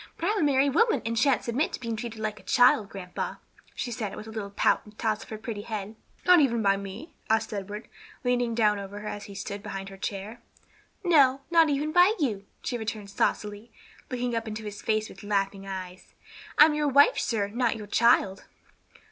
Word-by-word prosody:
"But 340 - -1
I'm 425 - 0
a - - +2
married 275 -1 +3
woman 455 +8 +3
and 230 0 -1
sha'n't 250 0 +3
submit 245 +6 -1
to - - -4
being 230 -2 -3
treated 225 0 -6
like 215 -1 -3
a - - -17
child, 220 -4 +4
grandpa," 180 -2 -5 0.4
she 245 - -3
said, 215 -4 -4
with - - -8
a 220 - -9
little 215 -2 -5
pout 200 - +2
and 210 - -15
a - - -34
toss 215 -2 -1
of - - -12
her 220 - -5
pretty 215 -1 -5
head. 215 -1 -5 0.3
"Not 360 -1 +7
even 235 -6 +2
by 195 0 +4
me?" 200 - -8 0.2
asked 220 0 +1
Edward, 205 +2 -6 0.4
leaning 245 -2 +1
down 210 -3 +3
over 200 +1 -7
her 210 - -7
as 205 -1 -5
he 200 - -10
stood 200 0 -5
behind 195 0 -6
her 195 - -11
chair. 200 +4 -5 0.6
"No, 280 -7 +5
not 330 -2 +5
even 295 +2 0
by 360 +6 +5
you," 215 - -1 0.2
she 245 - -2
returned 215 -2 -5
saucily, 210 +3 -1 0.4
looking 245 -1 -2
up 230 -1 -2
into 220 0 -5
his 205 -1 -7
face 215 0 0
with - - -13
laughing 195 -1 -1
eyes. 185 -1 -8 0.4
"I'm 300 +1 +8
your 300 0 0
wife, 285 - +5
sir, 210 -4 -1
not 235 +1 0
your 215 -2 -7
child." 205 -3 +3
220 Hz, 210 wpm, -27 LUFS, 205-255 Hz, 0.6 s, I'm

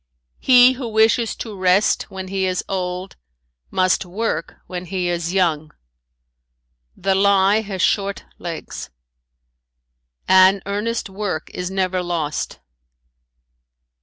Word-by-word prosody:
"He 250 -1 +7
who 255 -1 -5
wishes 220 +1 +2
to 220 -3 -7
rest 190 +2 +2
when 190 -1 -7
he 190 -1 -1
is 185 -1 -1
old 185 0 -4 0.5
must 185 0 +2
work 200 +6 -3
when 180 0 -6
he 180 0 -2
is 175 -1 -2
young. 160 -5 0 1.3
"The 195 +1 +1
lie 200 +2 +4
has 195 -4 -3
short 200 -1 0
legs. 170 -2 -6 1.4
"An 190 +1 +5
earnest 210 +4 -2
work 195 -5 -4
is 180 0 -4
never 185 -1 -1
lost. 165 - -3
190 Hz, 110 wpm, -20 LUFS, 180-205 Hz, 1.4 s, He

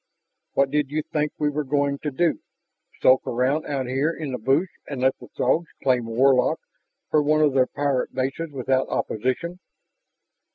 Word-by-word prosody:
What 140 -1 +2
did 150 -2 +1
you 155 +1 -1
think 150 0 -1
we 150 -1 +1
were 150 +1 -2
going 140 0 0
to 150 - -2
do? 165 +4 +1 0.6
Sulk 130 0 +6
around 130 +6 0
out 135 -2 -2
here 135 +5 0
in 155 -4 -5
the 125 - -3
bush 135 - +2 0.2
and 140 -3 -5
let 130 +1 +3
the - - -12
Throgs 165 +1 +1 0.2
claim 125 -4 +2
Warlock 130 +3 +3 0.5
for 155 - +4
one 155 +1 +2
of 150 -3 +4
their 130 -1 +3
pirate 140 -3 -1
bases 135 +5 -2
without 130 -1 0
opposition?" 130 +11 -2
140 Hz, 170 wpm, -24 LUFS, 130-150 Hz, 0.6 s, Sulk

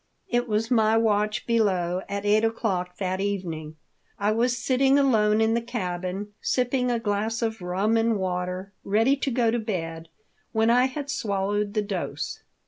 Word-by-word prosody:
It 240 0 0
was 220 +2 -1
my 220 -2 +4
watch 210 -1 +1
below 185 -6 +1
at 200 0 -3
eight 210 +1 +4
o'clock 190 -6 -1
that 185 -1 -2
evening. 170 -6 -3 0.4
I 205 +1 +1
was 240 +3 +1
sitting 265 +2 +3
alone 220 -6 +3
in 225 0 +3
the 235 - +1
cabin, 190 -3 -4
sipping 250 0 +1
a 240 - +1
glass 220 +1 -1
of 225 -3 -2
rum 195 +5 +1
and 225 -1 +2
water, 185 +1 -3
ready 225 +7 +3
to 275 - -1
go 235 -2 +2
to 240 - 0
bed 165 -7 -4 0.4
when 225 0 +3
I 250 +2 +5
had 280 +2 -4
swallowed 205 -1 -1
the 210 - +1
dose. 175 -8 -4
215 Hz, 165 wpm, -25 LUFS, 190-230 Hz, 0.4 s, I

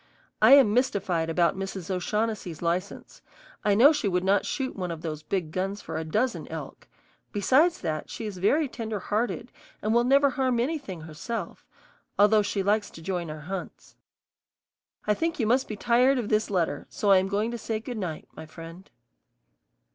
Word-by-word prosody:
I 220 +5 +8
am 270 -7 +7
mystified 195 -9 0
about 170 +1 +2
Mrs. 190 -1 -5
O'Shaughnessy's 190 -2 -2
license. 180 +4 -3 0.4
I 205 -1 +3
know 275 +9 +7
she 290 -8 -1
would 180 -1 0
not 195 +1 +2
shoot 265 -2 -3
one 180 -2 -3
of 165 -1 -6
those 155 -2 -4
big 165 0 -3
guns 195 +3 -2
for - - -7
a 160 - -2
dozen 220 +10 -1
elk; - - -8 0.4
besides 275 - +3
that, 155 -1 -3
she 225 - -6
is 200 -4 -6
very 285 - +2
tender 225 -4 -4
hearted 230 +5 -2 0.3
and 215 +1 0
will 235 +1 +4
never 275 +2 +4
harm 255 -3 0
anything 250 - -3
herself, 165 +6 -6 0.5
although 210 +1 +5
she 200 -1 -1
likes 205 +2 +1
to 165 - -12
join 175 -2 -3
our 155 0 -7
hunts. 185 +4 -7 1.1
I 210 - +3
think 330 +7 -2
you 225 - +1
must 250 +4 +2
be 215 - -5
tired 245 +5 +3
of 235 -4 -2
this 215 0 +1
letter, 170 -7 -1
so 205 - 0
I 190 - +7
am 190 - -1
going 210 +4 -1
to 240 - -4
say 220 0 -3
good 230 0 -6
night, 170 -6 -5
my 160 - -10
friend. 165 +3 -11
205 Hz, 185 wpm, -27 LUFS, 180-235 Hz, 1.1 s, I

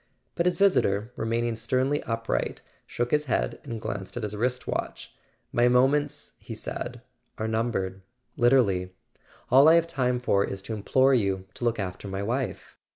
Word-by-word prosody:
But 170 0 +1
his 180 - +1
visitor, 120 - +2
remaining 115 +1 -1
sternly 130 +6 0
upright, 115 0 -2 0.2
shook 120 0 -2
his 150 0 +2
head - - -1
and 115 -1 -5
glanced 95 +1 -5
at 120 - -3
his 105 0 -3
wrist 125 +4 -1
watch. - - -4 0.4
"My 120 +1 +3
moments,"he 140 +4 +1
said, - - -6 0.3
"are 110 - -2
numbered—literally; 110 -1 0 0.6
all 135 +4 +8
I 165 - +7
have 170 0 +4
time 125 -7 0
for 100 -5 +2
is 95 -1 -5
to 110 - -5
implore 130 +6 +3
you 100 -6 +1
to 120 - -5
look 115 -1 +1
after 95 0 -5
my 95 +1 -3
wife." 120 -2 -3
120 Hz, 155 wpm, -27 LUFS, 100-130 Hz, 0.6 s, all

